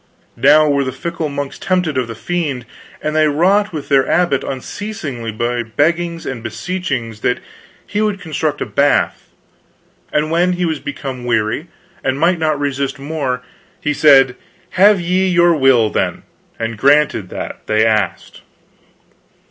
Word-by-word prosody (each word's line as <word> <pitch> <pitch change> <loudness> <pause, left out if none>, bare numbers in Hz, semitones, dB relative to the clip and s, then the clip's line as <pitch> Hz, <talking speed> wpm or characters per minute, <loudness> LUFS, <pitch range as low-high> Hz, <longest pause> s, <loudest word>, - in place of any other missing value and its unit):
Now 150 +2 +5
were 140 -1 +2
the 130 - -3
fickle 165 +3 -4
monks 140 -1 -5
tempted 180 -5 0
of 130 -2 0
the 115 - -7
Fiend, 145 -4 -3 0.4
and 155 0 -1
they 155 0 +4
wrought 190 +8 +2
with 155 -4 -6
their 135 -2 +3
abbot 170 -6 +2
unceasingly 135 - -5
by 120 +2 -1
beggings 165 +8 -1
and 130 -3 -4
beseechings 120 - -4
that 125 - 0 0.5
he 205 - -2
would 210 -2 0
construct 155 -3 -2
a - - 0
bath; 145 0 +1 0.8
and 155 +1 0
when 175 +2 +2
he 180 0 -1
was 160 -3 -1
become 135 -3 -6
aweary 115 +6 0 0.4
and 135 +1 -1
might 170 +2 +2
not 155 -2 0
resist 140 -1 -2
more, 135 -3 -3 0.4
he 150 - -1
said 135 -4 +5 0.4
have 200 +2 +5
ye 180 +2 +1
your 175 -1 +4
will, 130 -6 +4
then, - - -1 0.3
and 115 -1 -4
granted 140 -6 +3
that - - -7
they 110 +1 +3
asked. 110 -5 -1
145 Hz, 150 wpm, -17 LUFS, 125-170 Hz, 0.8 s, Now